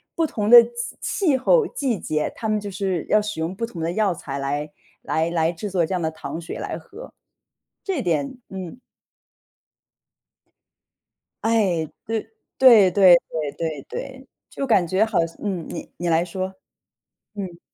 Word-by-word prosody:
不 330 - +2
同 210 -7 -2
的 240 -1 +11
气 240 0 -6
气 310 -10 +1
候、 455 - +3
季 250 -8 -2
节， 155 -1 -2
他 220 -2 -3
们 215 0 +1
就 205 -1 -6
是 185 -3 -2
要 210 - +4
使 210 -5 -5
用 165 +4 -2
不 230 - -6
同 175 -8 -9
的 165 +1 -1
药 205 0 +1
材 140 -3 -6
来 145 +2 -3 0.3
来 160 +1 0
来 165 -1 +1
制 185 +5 -6
作 180 -3 +1
这 190 - -4
样 180 - -1
的 160 - 0
糖 160 +1 -7
水 165 - -7
来 - - -4
喝， - - -12 0.7
这 370 -9 -2
点 165 - -1
嗯。 190 +4 -7 2.6
哎， 195 -8 +2 0.2
对， 225 0 -1 0.4
对 225 -8 +8
对 185 -2 +7
对 150 -3 -3
对 160 -4 -3
对。 265 0 -7 0.2
就 275 - -4
感 195 -7 +4
觉 190 +6 +2
好 195 -7 +1
像 165 - -12
嗯， 185 -6 -2
你 - - -7
你 175 - -3
来 165 +1 +3
说。 185 +2 -4 0.8
嗯。 180 -4 -6
190 Hz, 180 characters per minute, -23 LUFS, 165-225 Hz, 2.6 s, 的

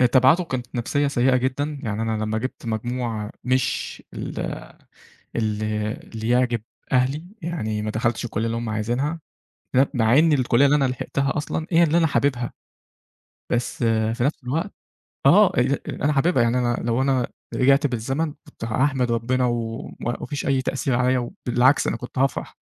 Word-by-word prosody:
آآ 125 - +6
تبعاته 130 +8 +5
كانت 130 -5 -4
نفسية 140 +4 0
سيئة 130 -1 +3
جدًا، 140 +3 -1
يعني 110 -1 -2
أنا 110 -1 -1
لما 110 +1 -1
جِبت 130 0 -5
مجموع 115 -1 -3
مش 130 0 -1
ال - - -5 1.0
اللي 110 -1 -1
اللي 110 -2 -7
يعجب 120 -2 +2 0.3
أهلي، 135 +5 +2 0.2
يعني 110 -11 -2
ما 110 - -2
دخلتش 115 +2 -1
الكلية 110 -1 -2
اللي 115 0 -1
هُم 115 -1 -3
عايزينها، 120 +9 -1 0.6
أ 135 - +6
مع 120 +3 +4
إن 160 0 +5
الكلية 130 -1 +3
اللي 145 +2 +4
أنا 140 - +2
لحِقتها 135 +2 -1
أصلًا 155 +2 -2
هي 170 0 +5
اللي 165 +1 +4
أنا 165 - +4
حاببها. 130 -5 0 1.0
بس 120 0 -1
آآ 110 -1 +2
في 120 - -2
نفس 140 -1 -1
الوقت 160 +10 -2 0.6
آه، 195 +7 +7
أ 130 +3 +2
أنا 150 +1 0
حاببها 140 -1 +3
يعني 120 +2 +2
أنا 120 -1 +1
لو 120 +2 +1
أنا 130 -3 +2 0.3
رجعت 140 +3 +4
بالزمن 135 +5 -2
كنت 130 - -9
هاحمد 125 +1 +1
ربنا، 125 +2 +1
وما 115 0 -3
فيش 145 -2 -4
أي 135 -1 +2
تأثير 135 -1 -1
عليّا، 125 +1 +2 0.3
وبالعكس 125 +4 +4
أنا - - 0
كنت 125 0 -8
هافرح 135 0 0
125 Hz, 165 wpm, -23 LUFS, 115-140 Hz, 1.0 s, آه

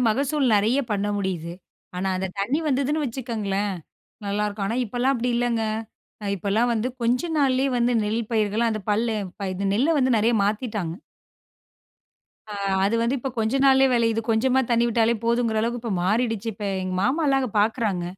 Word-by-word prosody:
மகசூல் 280 +5 +1
நெறைய 220 +6 +2
பண்ண 205 0 0
முடியுது. 175 -4 -3 0.4
ஆனா 190 +1 -1
அந்த 190 - -2
தண்ணி 245 +10 0
வந்ததுன்னு 285 +2 +1
வச்சுக்கோங்களேன், 215 -6 -2 0.5
நல்லாருக்கும். 205 0 -2
ஆனா 225 - -2
இப்போலாம் 245 +5 0
அப்டி 245 +1 -1
இல்லைங்க. 240 -2 0 0.6
அ - - -6
இப்போலாம் 210 +6 +1
வந்து 230 +2 0
கொஞ்ச 240 +2 +2 0.2
நாள்லேயே 270 -1 +2
வந்து 240 0 +2
நெல் 220 +3 -1
பயிர்கள் 220 +1 +1
அந்த 215 -1 -2
பல்ல 220 +1 +1 0.4
இந்த 195 +2 -2
நெல்ல 285 +9 +2
வந்து 260 -2 +2
நெறைய 230 +3 +2
மாத்திட்டாங்க. 210 -5 -2 1.5
ஆ, 210 - -9 0.3
அது 200 +3 +1
வந்து 245 +4 +1
இப்ப 265 +2 -4
கொஞ்சம் 240 +5 +1
நாள்லேயே 265 0 +5
வெளையிது. 230 -1 +2
கொஞ்சமா 255 +4 +3
தண்ணி 235 0 +3
விட்டாலே 230 0 +2
போதுங்கிற 235 -1 +1
அளவுக்கு 235 +1 -2
இப்ப 230 -4 -3
மாறிடுச்சு. 225 +1 0
இப்ப 205 - -7 0.2
எங்க 185 0 -3
மாமாலாம் 275 +3 +2
அங்க 255 -4 -2
பாக்குறாங்க. 210 -4 0
230 Hz, 160 wpm, -24 LUFS, 210-250 Hz, 1.5 s, நாள்லேயே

